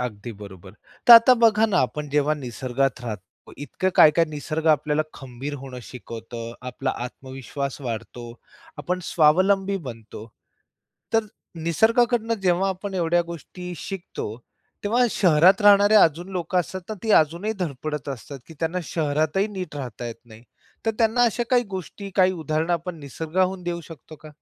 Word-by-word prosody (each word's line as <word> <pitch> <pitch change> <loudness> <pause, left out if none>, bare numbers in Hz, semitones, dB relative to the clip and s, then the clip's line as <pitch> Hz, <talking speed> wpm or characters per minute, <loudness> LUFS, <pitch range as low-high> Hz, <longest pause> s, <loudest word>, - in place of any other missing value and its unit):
अगदी 120 -2 -5
बरोबर. 100 -2 -12 0.3
तर 240 - +11
आता 230 +2 +9
बघा 225 -2 +4
ना, 200 -4 +1
आपण 150 +3 -1
जेव्हा 150 +1 +2
निसर्गात 130 -1 -2
राहतो 105 -6 -9
इतकं 145 +6 -2
काय, 155 - +8
काय 165 +2 +2
निसर्ग 155 +1 -4
आपल्याला 150 0 +2
खंबीर 135 +2 -7
होणं 130 -1 -9
शिकवत, 115 -1 -10 0.3
आपला 130 +1 -3
आत्मविश्वास 135 +2 -6
वाढतो, 120 -1 -6 0.5
आपण 180 +1 -2
स्वावलंबी 190 +6 +3
बनतो. 115 -2 -10 0.9
तर 225 -1 +3 0.4
निसर्गाकडनं 230 +6 +2
जेव्हा 185 +1 +2
आपण 190 +1 -5
एवढ्या 175 -1 +2
गोष्टी 180 +2 -8
शिकतो, 165 - -6 0.5
तेव्हा 235 +4 +3
शहरात 185 +2 +4
राहणारे 205 +1 +6
अजून 170 -2 +4
लोक 180 0 -3
असतात 180 +1 -1
ना - - -2
ती 225 - -2
अजूनही 170 +8 -2
धडपडत 150 -3 -4
असतात 140 +1 -7
की 165 - -13
त्यांना 165 +2 -1
शहरातही 155 +5 0
नीट 185 -7 -6
राहता 125 -4 -6
येत 115 - -6
नाही. 110 -1 -15 0.4
तर - - +4
त्यांना 230 +1 +3
अशा 235 +1 +1
काही 245 -1 +4
गोष्टी 190 +2 -7
काही 185 -1 +4
उदाहरण 160 -1 -2
आपण 170 0 -2
निसर्गाहून 180 +6 -2
देऊ 175 -1 -3
शकतो 155 0 -12
का? 155 - -13
160 Hz, 150 wpm, -23 LUFS, 135-190 Hz, 0.9 s, तर